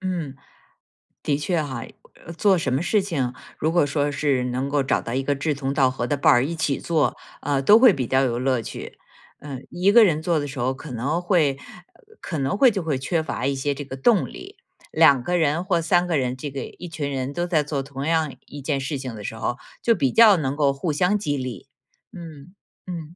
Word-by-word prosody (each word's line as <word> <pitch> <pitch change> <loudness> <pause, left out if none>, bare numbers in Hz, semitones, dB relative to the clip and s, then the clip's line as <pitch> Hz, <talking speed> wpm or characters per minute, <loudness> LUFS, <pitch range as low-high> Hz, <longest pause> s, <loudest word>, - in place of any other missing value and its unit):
嗯， 175 -7 -4 0.9
的 145 - +1
确 160 +3 -1
哈， 130 -6 -5 0.4
呃 170 - -8
做 195 +2 +3
什 140 -6 -1
么 135 - +1
事 210 +4 +2
情， 140 -10 -2 0.2
如 155 - 0
果 170 -3 +3
说 145 0 -1
是 140 -3 0
能 130 +2 -2
够 140 -1 +1
找 135 - 0
到 115 - -6
一 135 +1 -1
个 145 +1 0
志 145 +2 -1
同 135 -1 -3
道 135 -2 +3
合 120 -2 -3
的 145 - 0
伴 - - +4
儿 120 +2 +4
一 165 +3 -3
起 155 -4 -1
做， 155 -7 0 0.3
呃， 140 -2 0
都 205 +11 +7
会 245 -4 +7
比 130 -6 -3
较 130 +2 +2
有 120 -2 0
乐 130 -1 +1
趣。 - - -8 0.4
嗯， 140 -3 -8
1 185 +3 +2
个 235 +1 +8
人 155 -5 +1
做 165 -1 +1
的 145 - -3
时 135 -1 -7
候 130 +2 0
可 140 +2 -10
能 140 +8 -2
会， 165 -7 +2 0.4
呃， - - -25 0.2
可 165 - -4
能 140 +7 -1
会 260 +3 +6
就 195 -4 -3
会 155 -4 -1
缺 160 +5 -1
乏 145 - -4
一 140 0 0
些 140 +2 -1
这 140 +1 -6
个 135 -1 -8
动 180 - +3
力。 - - -11 0.3
2 135 -3 +5
个 180 +5 0
人 160 +1 +1
或 180 -3 +1
3 175 +2 +2
个 170 -3 0
人， 125 -2 -1
这 140 +2 -6
个 135 -1 -5
一 175 - -10
群 155 -3 -4
人 135 0 -3
都 175 +3 -2
在 160 -4 +2
做 145 -1 -3
同 135 0 -6
样 160 -4 0
一 145 - -10
件 140 0 -1
事 140 +2 -3
情 130 -3 -6
的 105 - -9
时 110 - -5
候， 120 +2 -3 0.2
就 230 - +3
比 135 - +1
较 225 -3 +7
能 135 -4 -1
够 145 -2 +2
互 155 +4 -2
相 180 +7 +2
激 145 -8 -2
励。 130 -4 -6 0.5
嗯， 165 -1 -11 0.3
嗯。 170 -2 -7
145 Hz, 245 characters per minute, -23 LUFS, 135-170 Hz, 0.9 s, 个